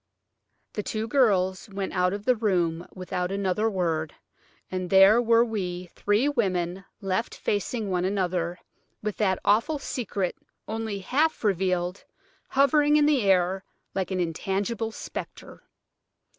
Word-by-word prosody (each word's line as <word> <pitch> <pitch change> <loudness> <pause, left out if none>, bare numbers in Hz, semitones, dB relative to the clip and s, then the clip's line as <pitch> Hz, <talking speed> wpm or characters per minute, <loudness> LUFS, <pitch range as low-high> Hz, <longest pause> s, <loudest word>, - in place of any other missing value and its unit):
The 210 - -2
two 215 +2 -3
girls 205 -7 +2
went 195 -1 -4
out 180 -1 +2
of 205 +1 -5
the 255 - +4
room 175 -6 0
without 185 0 -3
another 200 +2 0
word, 165 -6 -1 0.6
and 185 -1 -3
there 195 +4 +7
were 230 0 +4
we 180 -5 -4
three 205 +7 +1
women 190 -8 -1 0.2
left 195 +4 -1
facing 210 +2 -2
one 180 -1 0
another, 180 -3 -1 0.5
with 210 -1 -3
that 190 -3 +2
awful 230 +9 +3
secret, 210 -9 -3 0.3
only 220 -2 -3
half 295 +11 +1
revealed, 185 -2 0 0.5
hovering 290 +2 +4
in 300 -1 +5
the 295 -4 +3
air 190 -1 +2 0.3
like 190 -1 -2
an 185 -1 -2
intangible 195 +6 -2
spectre. - - -8
195 Hz, 130 wpm, -26 LUFS, 180-225 Hz, 0.6 s, there